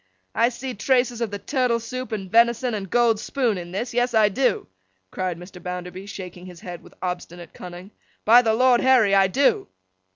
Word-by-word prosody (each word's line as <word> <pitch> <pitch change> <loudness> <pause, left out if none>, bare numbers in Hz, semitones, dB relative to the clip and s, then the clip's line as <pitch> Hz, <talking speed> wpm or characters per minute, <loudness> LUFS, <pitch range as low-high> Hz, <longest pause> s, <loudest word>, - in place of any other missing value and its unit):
I 230 +2 +3
see 250 +1 -6
traces 245 +1 +1
of 230 - -1
the 205 - -5
turtle 250 0 0
soup, 255 +3 -6
and 200 -3 -4
venison, 235 +3 +3
and 195 -3 -4
gold 235 -1 +3
spoon 240 -2 -1
in 175 0 -9
this. 235 +7 -4
Yes, 245 0 0
I 215 -1 +5
do!' 255 +5 0 0.5
cried 185 -2 -3
Mr. 180 +1 -12
Bounderby, 180 +2 -6
shaking 180 -2 -9
his 175 -2 -12
head 175 -2 -8
with - - -18
obstinate 175 -2 -6
cunning. 180 +2 -10 0.3
'By 235 +3 +7
the 220 -2 +1
Lord 250 0 +4
Harry, 250 -6 +4
I 195 -1 +5
do! 265 +9 +1
220 Hz, 190 wpm, -23 LUFS, 185-245 Hz, 0.5 s, By